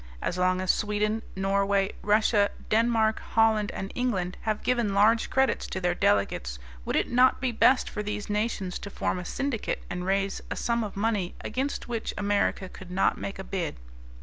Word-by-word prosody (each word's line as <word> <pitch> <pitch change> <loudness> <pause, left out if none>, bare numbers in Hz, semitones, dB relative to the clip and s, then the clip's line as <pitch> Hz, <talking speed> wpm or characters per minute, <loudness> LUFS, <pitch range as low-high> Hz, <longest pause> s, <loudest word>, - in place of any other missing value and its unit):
As 175 - -2
long 185 0 +2
as 185 - +3
Sweden, 210 +1 0
Norway, 195 0 +1
Russia, 210 0 +3 0.2
Denmark, 220 0 +3
Holland, 220 -2 +2
and 195 - -5
England 195 -8 -1
have 215 -1 -2
given 235 -5 +1
large 220 +3 +4
credits 265 0 +1
to 190 - -4
their 180 -1 +1
delegates, 80 - +1 0.3
would - - -1
it - - +1
not 250 +1 +5
be 260 -2 0
best 250 +3 +4
for 210 - -4
these 210 0 -4
nations 210 -3 -2
to 200 - -7
form 185 - -2
a 180 - -6
syndicate 270 +2 -2
and 180 0 -3
raise 195 +1 0
a - - -3
sum 235 -1 0
of 205 -2 -6
money 205 -4 0
against 265 +5 -3
which 230 -2 -3
America 205 -2 0
could 185 0 -12
not 185 +2 +1
make 195 - -5
a 190 - -6
bid? 185 -4 -3
205 Hz, 180 wpm, -27 LUFS, 190-225 Hz, 0.3 s, not